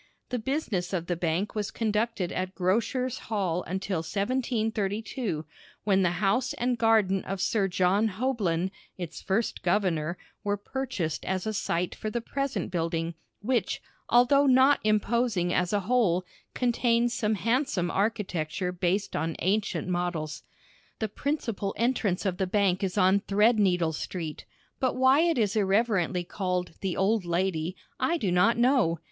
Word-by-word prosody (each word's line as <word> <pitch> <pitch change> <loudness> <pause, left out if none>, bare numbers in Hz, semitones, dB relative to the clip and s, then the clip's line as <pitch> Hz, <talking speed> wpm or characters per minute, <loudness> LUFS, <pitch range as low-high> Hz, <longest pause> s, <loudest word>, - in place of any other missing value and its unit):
The 250 - -1
business 220 - -2
of 170 -3 -1
the 175 - -1
bank 170 +4 -1
was 210 -2 -2
conducted 215 -3 -1
at 185 +1 -3
Grocers' 235 +7 0
Hall 185 -6 0
until 190 -1 -2
1732, 215 - -2 0.4
when 195 -2 +3
the 180 -2 +2
house 210 +7 +1
and 245 +1 0
garden 220 -4 +3
of 195 0 -4
Sir 200 0 +1
John 185 +4 +2
Houblon, 190 -6 -1 0.3
its 175 -4 -6
first 205 +4 -1
governor, 175 -5 0 0.3
were 205 0 0
purchased 205 - -3
as 190 +1 -1
a 220 - -1
site 180 -3 -1
for 215 - -4
the 235 - -2
present 275 0 -3
building, 165 -1 -1 0.3
which, 245 +1 0 0.3
although 275 +4 +5
not 265 +2 +5
imposing 215 -3 +1
as 180 -1 +1
a 205 -1 +1
whole, 190 -5 +2 0.3
contains 240 -1 +2
some 215 -2 0
handsome 220 - 0
architecture 185 -4 -1
based 180 +3 -1
on 160 +1 -1
ancient 200 +1 0
models. 175 -4 -2 0.6
The 220 - -2
principal 230 -6 -2
entrance 225 -6 0
of 185 -2 0
the 190 - 0
bank 195 0 +1
is 190 +1 -2
on 190 +1 +5
Threadneedle 200 -6 +3
Street, 160 0 -5 0.3
but 260 - +1
why 260 +2 +5
it 335 -2 +3
is 210 -3 +1
irreverently 195 -3 +2
called 180 0 -2
"the 190 -3 -2
Old 205 +2 +2
Lady" 175 0 -1 0.2
I 340 - +1
do 200 - -1
not 180 +7 +4
know. 240 - +3
200 Hz, 145 wpm, -28 LUFS, 180-230 Hz, 0.6 s, although